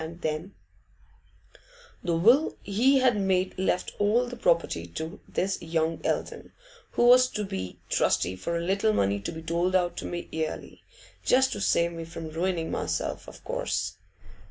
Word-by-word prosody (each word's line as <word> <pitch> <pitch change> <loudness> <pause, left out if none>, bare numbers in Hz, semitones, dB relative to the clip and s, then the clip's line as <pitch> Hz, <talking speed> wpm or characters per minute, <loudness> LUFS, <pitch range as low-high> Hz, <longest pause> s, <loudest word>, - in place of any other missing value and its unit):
And 165 +2 -8
then 155 +5 -3 1.5
'The 170 -2 0
will 240 - +4
he 245 +8 +3
had 255 -3 +4
made 190 -2 +1
left 185 -1 0
all 215 +4 +3
the 245 0 -7
property 170 - +1
to 160 - -6
this 190 +1 -1
young 165 0 -1
Eldon, - - -3 0.4
who 240 - +3
was 250 +1 +7
to 210 - -3
be 95 - -5
trustee 90 +1 +1
for 170 - -3
a - - -2
little 200 +5 +1
money 100 - +1
to 100 - -5
be 160 - -8
doled 170 +3 0
out 175 -1 +2
to - - -4
me 175 0 -5
yearly, 160 -1 -4 0.4
just 260 +1 +4
to 205 - -4
save 170 -3 +2
me 165 -1 -6
from 165 -1 -7
ruining 170 0 -1
myself, - - -2
of - - -12
course. - - -2
175 Hz, 165 wpm, -27 LUFS, 160-210 Hz, 1.5 s, was